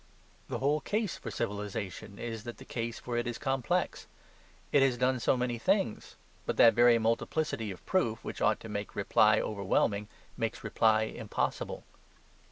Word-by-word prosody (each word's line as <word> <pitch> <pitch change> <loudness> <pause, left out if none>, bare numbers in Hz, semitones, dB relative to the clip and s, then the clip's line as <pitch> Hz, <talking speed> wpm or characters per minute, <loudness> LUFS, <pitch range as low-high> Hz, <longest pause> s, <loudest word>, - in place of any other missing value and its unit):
The - - -2
whole 145 +3 +1
case 210 +5 -1
for 115 - -7
civilization 100 0 -4
is 115 -2 -5
that 120 - -6
the 130 - -12
case 115 -2 -4
for 120 -1 -4
it 120 +1 -1
is 120 - -3
complex. 135 -2 -1 0.6
It 145 - +5
has 135 -2 +3
done 130 +1 +2
so 130 - +2
many 125 -1 -1
things. 190 - 0 0.3
But - - -1
that 115 - +8
very 120 +1 +6
multiplicity 115 +1 0
of 95 - -9
proof 115 -13 +1
which - - -6
ought 105 0 +3
to - - -8
make 105 -1 -5
reply 105 +1 +4
overwhelming 100 0 0 0.3
makes 115 0 -2
reply 110 0 +3
impossible. 110 - -3
115 Hz, 165 wpm, -31 LUFS, 110-130 Hz, 0.6 s, that